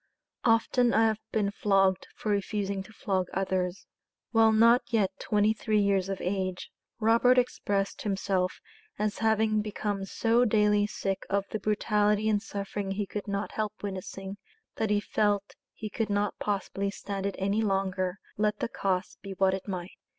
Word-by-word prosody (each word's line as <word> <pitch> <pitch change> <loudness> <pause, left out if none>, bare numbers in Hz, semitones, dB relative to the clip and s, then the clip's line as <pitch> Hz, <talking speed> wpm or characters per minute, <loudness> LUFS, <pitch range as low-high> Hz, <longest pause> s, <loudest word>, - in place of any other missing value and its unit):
"Often 235 +1 +3
I 225 +1 +5
have 220 -1 +1
been 205 -2 +1
flogged 195 -2 +2
for 215 - -2
refusing 200 -1 -1
to 195 - -12
flog 190 -4 -1
others." 185 -1 -1 0.5
While 225 -1 +5
not 230 +3 +6
yet 210 -5 +2
twenty 210 +1 +2
three 215 -1 0
years 195 -2 +2
of 195 - -3
age, 185 -1 -2 0.3
Robert 230 +3 +4
expressed 205 -5 0
himself 195 -2 -1 0.4
as 210 0 -1
having 220 -1 +2
become 205 -2 -3
so 230 +4 +2
daily 210 -2 +3
sick 195 -2 -3
of 200 0 +1
the 215 - -2
brutality 210 0 +1
and 205 -1 +2
suffering 200 -1 -4
he 200 +1 -1
could 205 +1 -6
not 200 0 -2
help 215 -1 -2
witnessing, 195 0 -5 0.4
that 220 -1 0
he 205 0 +3
felt 205 -1 0 0.2
he 220 - -6
could 215 +1 -2
not 205 0 0
possibly 200 -1 -2
stand 200 0 -4
it 200 - -3
any 200 +3 +1
longer, 195 -2 0 0.2
let 210 0 +1
the - - -2
cost 190 -3 -2
be 195 -1 -6
what 190 0 +3
it 190 +1 -4
might. 185 -2 -4
205 Hz, 165 wpm, -28 LUFS, 195-215 Hz, 0.5 s, not